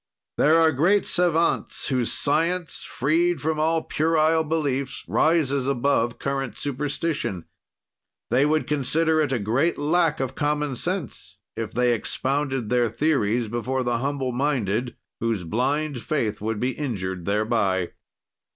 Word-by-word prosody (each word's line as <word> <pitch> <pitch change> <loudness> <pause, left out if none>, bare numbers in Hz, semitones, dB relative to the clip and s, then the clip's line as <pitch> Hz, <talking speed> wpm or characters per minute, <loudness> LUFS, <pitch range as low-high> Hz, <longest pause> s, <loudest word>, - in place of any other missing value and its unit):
There 155 +3 +5
are 165 -1 +5
great 175 +9 +2
savants, 170 -2 +1
whose 125 -4 +1
science, 165 +4 0
freed 165 +5 0
from 155 +3 -1
all 160 +1 +1
puerile 160 0 +2
beliefs, 140 -4 -2
rises 140 -5 +2
above 120 -3 +1
current 135 -2 -3
superstition. 140 - -2 0.9
They 125 +3 +4
would 155 +1 +2
consider 155 +3 +1
it 145 -3 0
a 130 - +1
great 120 +10 +1
lack 160 +1 +1
of 130 -1 -2
common 145 -1 -1
sense 130 - -4 0.2
if 115 -1 -4
they 125 0 +2
expounded 135 +1 -2
their 120 -2 +2
theories 120 -3 +1
before 120 +4 -2
the 120 -1 0
humble 135 0 -2
minded, 125 -3 -1 0.2
whose 115 -5 -1
blind 135 - -1
faith 110 -9 -2
would 110 0 -2
be 125 +3 0
injured 95 - -4
thereby. 100 -3 0
135 Hz, 135 wpm, -24 LUFS, 120-155 Hz, 0.9 s, There